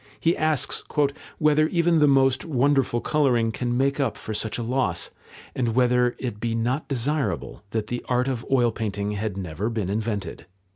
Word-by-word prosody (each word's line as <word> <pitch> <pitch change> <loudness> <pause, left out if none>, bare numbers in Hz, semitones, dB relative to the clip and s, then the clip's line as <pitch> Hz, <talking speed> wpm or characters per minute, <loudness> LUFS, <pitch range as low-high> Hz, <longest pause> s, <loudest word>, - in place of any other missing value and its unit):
He 165 +1 +2
asks 155 -4 0 0.5
"whether 155 0 +3
even 170 -1 +2
the 150 - +5
most 135 -2 +3
wonderful 135 -4 +1
colouring 125 -7 +2
can 120 +2 -2
make 140 +2 +1
up 135 -6 0
for 110 - -6
such 110 0 -2
a 120 - -3
loss, 120 -8 -1 0.4
and 115 -3 -1
whether 125 -1 +3
it 120 -5 -5
be 115 0 -1
not 125 +6 -1
desirable 140 +2 -2
that 110 0 -2
the 120 +3 -4
art 125 +1 +2
of 125 -3 -2
oil 125 -3 +3
painting 105 -2 -3
had 105 -1 -3
never 95 +3 -3
been 110 -5 -2
invented." 105 -4 -3
125 Hz, 175 wpm, -24 LUFS, 110-135 Hz, 0.5 s, the